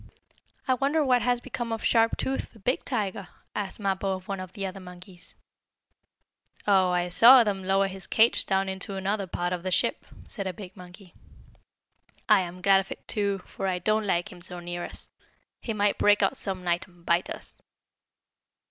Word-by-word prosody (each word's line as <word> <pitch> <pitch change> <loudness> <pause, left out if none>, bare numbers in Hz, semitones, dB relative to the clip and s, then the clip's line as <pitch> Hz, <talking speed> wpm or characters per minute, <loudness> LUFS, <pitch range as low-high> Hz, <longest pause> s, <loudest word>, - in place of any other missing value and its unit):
"I 260 - +4
wonder 285 +4 +1
what 250 -2 +3
has 245 +1 +1
become 240 -1 -5
of 225 - -3
Sharp 230 -1 +3
Tooth, 270 - -3
the 225 - -17
big 250 +7 -1
tiger?" 200 -6 -3 0.3
asked 205 0 -4
Mappo, 195 -1 -1
of 185 0 -11
one 195 -1 -3
of 185 0 -8
the 200 -3 -4
other 190 +1 -6
monkeys. 180 0 -12 1.3
"Oh, 190 -3 +4
I 180 0 0
saw 240 +7 +8
them 200 -3 -2
lower 195 +1 +2
his 190 0 -3
cage 225 +2 +4
down 195 0 +1
into 190 +1 -5
another 195 +1 -2
part 175 +1 -2
of 180 - -3
the 185 - -3
ship," 185 - 0 0.2
said 195 -4 -5
a 185 - -3
big 190 0 -10
monkey. 180 0 -14 1.1
"I - - +6
am 180 0 -6
glad 195 -1 +6
of 195 - -6
it, - - -9
too, 200 -3 0
for 195 - -5
I 185 -1 0
don't 215 +4 0
like 175 +2 0
him 180 -2 -13
so 180 0 -4
near 175 0 -5
us. - - -6 0.5
He 230 - -4
might 205 -1 0
break 205 0 +4
out 195 - +2
some 190 -2 -3
night, 175 0 -1
and 175 -2 -22
bite 170 +2 +1
us." - - -8
195 Hz, 190 wpm, -27 LUFS, 180-210 Hz, 1.3 s, saw